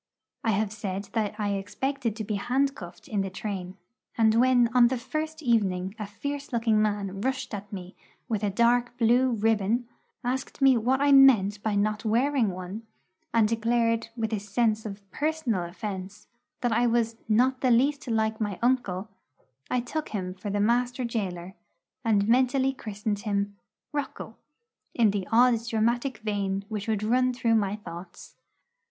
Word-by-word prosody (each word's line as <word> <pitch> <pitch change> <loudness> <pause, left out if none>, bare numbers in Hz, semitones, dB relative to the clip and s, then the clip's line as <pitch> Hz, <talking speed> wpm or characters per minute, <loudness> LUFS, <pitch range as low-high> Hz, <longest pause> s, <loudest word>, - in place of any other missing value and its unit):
I 225 - +1
have 210 -1 +1
said 200 -2 -5
that 215 -2 -1
I 205 -1 0
expected 215 +4 -2
to 220 - -4
be 215 +1 -3
handcuffed 240 -5 -2
in 205 -2 -1
the 195 - -2
train; 190 -1 -5 0.4
and 220 -1 +4
when 245 +1 +4
on 245 -1 +7
the 260 +1 -1
first 310 +5 -4
evening 195 -6 +1
a 210 - -4
fierce 285 +7 -5
looking 225 -3 +2
man 200 -2 -1
rushed 265 0 -2
at 205 0 -6
me 185 -1 -8 0.3
with 220 -4 -1
a 205 - +2
dark 240 +4 +2
blue 245 +2 +4
ribbon, 225 +1 +1 0.4
asked 255 +2 -3
me 270 -2 +6
what 250 +4 +1
I 285 0 +4
meant 220 -7 +6
by 215 -1 -1
not 215 +1 0
wearing 240 +1 +2
one, 185 +3 -6 0.5
and 225 -2 +4
declared, 230 0 +1
with 220 -1 -2
a 215 - 0
sense 215 +2 0
of 200 -1 -9
personal 290 - -1
offence, 190 +1 -6 0.4
that 245 - +1
I 235 +2 +3
was 230 -1 +1
'not 255 +4 +3
the 255 - +3
least 275 +4 +2
like 220 -1 0
my 205 -3 -2
uncle,' 230 -6 0 0.6
I 250 - +1
took 305 +6 -4
him 185 -3 -3
for 195 +2 -6
the 205 +1 -1
master 245 +4 +1
gaoler, 190 -6 -3 0.5
and 210 -3 +2
mentally 260 +2 +3
christened 210 -3 -4
him, 200 -1 -2 0.4
'Rocco,' 275 -6 -4 0.6
in 225 -4 +4
the 195 -2 -3
odd 240 0 +5
dramatic 235 +3 0
vein 200 -3 -2
which 210 -2 -4
would 215 -2 0
run 255 +3 +2
through 235 -2 +1
my 205 -2 +1
thoughts. 175 -3 -10
220 Hz, 165 wpm, -27 LUFS, 200-245 Hz, 0.6 s, on